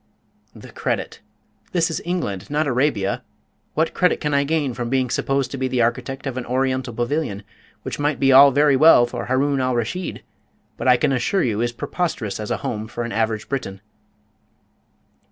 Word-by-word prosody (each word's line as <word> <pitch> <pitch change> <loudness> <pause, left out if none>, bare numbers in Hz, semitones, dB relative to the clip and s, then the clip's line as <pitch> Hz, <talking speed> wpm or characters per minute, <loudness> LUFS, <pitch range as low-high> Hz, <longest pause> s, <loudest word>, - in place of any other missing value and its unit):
"The - - -12
credit! - - -3 0.5
This 165 -2 +1
is - - -3
England, 135 - -3
not 150 +2 0
Arabia. 125 -7 0 0.5
What - - +1
credit - - +2
can 150 -1 -2
I 140 0 +3
gain 145 -3 0
from 120 0 -4
being 130 -1 0
supposed 135 -1 0
to 135 - -5
be 130 - 0
the 125 -2 +1
architect 125 +4 -2
of 130 -2 -4
an 125 - -4
Oriental 130 0 -1
pavilion, 120 -2 -2 0.4
which - - -5
might 145 0 0
be 135 0 +4
all 140 +2 +9
very 145 +1 +3
well 135 -3 +7
for 120 - -5
Haroun 135 +2 +1
al 130 -1 0
Raschid, 120 +11 -3 0.5
but - - -4
I 125 -1 +6
can 140 +3 +1
assure 135 +9 +1
you 110 -3 0
is 120 0 0
preposterous 120 - -3
as 105 - -5
a - - 0
home 110 -1 -3
for 120 +1 -5
an 120 - -5
average 110 -1 -1
Briton?" 110 -8 -4
130 Hz, 185 wpm, -21 LUFS, 120-145 Hz, 0.5 s, all